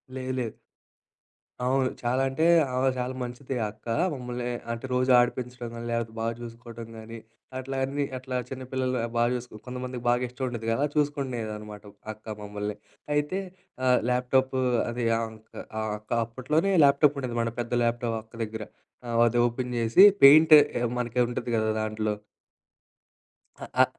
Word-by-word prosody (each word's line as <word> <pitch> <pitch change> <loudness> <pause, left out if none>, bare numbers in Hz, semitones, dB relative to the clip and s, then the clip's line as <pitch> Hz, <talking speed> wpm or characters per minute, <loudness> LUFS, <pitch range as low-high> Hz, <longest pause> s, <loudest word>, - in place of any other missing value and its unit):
లేదు 130 0 -4
లేదు. 115 -3 -3 1.1
అవును. 130 0 +2
చాలా 125 +2 +1
అంటే, 155 +5 0 0.3
ఆమె 130 +1 +2
చాలా 125 +1 -2
మంచిది 125 +2 -5
ఆ 105 - 0
అక్క. 110 +2 -26 0.3
మమ్మల్ని 125 -2 -5 0.3
అంటే, 115 +3 -5
రోజు 130 +1 +2
ఆడిపించడం 125 0 -2
గానీ, 115 0 -6
లెపోతే 115 -1 -2
బా 115 - -1
జూసుకోడం 115 -1 -9
గానీ, 115 +1 -9 0.4
అట్లా 135 +1 -4
అన్ని. 140 +1 -1
అట్లా 130 0 -6
చిన్న 130 -1 -6
పిల్లలు 130 -1 0 0.2
బా 120 - +4
చూసు 125 0 -4 0.2
కొంతమందికి 125 -1 -6
బాగా 120 +1 +2
ఇష్టం 130 +2 -7
ఉండుద్ది 115 -2 -5
కదా! 140 +6 +1
చూసుకునేదనమాట. 115 -8 -2 0.3
అక్క 110 0 -8
మమ్మల్ని. 105 0 -4 0.4
అయితే 150 +6 0 0.5
ఆహ్, 125 -1 +5
ల్యాప్‌టాప్ 130 +1 +1 0.3
అది 120 0 -2
ఆ - - -1
అక్క 110 0 -17 0.3
ఆ - - -1 0.2
అక్క 105 - -26
అప్పట్లోనే 150 - 0
ల్యాప్టాప్ 140 +1 +4
ఉండేది, 125 -3 -3
మన 115 - 0
పెద్ద 120 - -7
ల్యాప్‌టాప్. 115 -1 0
అక్క 110 - -32
దగ్గర. 110 0 -5 0.4
ఆ - - -5 0.2
అది 120 +1 0
ఓపెన్ 125 +1 -4
చేసి, 115 +11 +6 0.2
పెయింట్ 155 +3 +9 0.4
మనకి 120 0 -2
ఉంటుంది 120 - -4
కదా! 110 0 +1
దాంట్లో. 110 -1 -1 1.5
అ - - -4 0.2
అ - - +9
125 Hz, 155 wpm, -27 LUFS, 115-130 Hz, 1.5 s, పెయింట్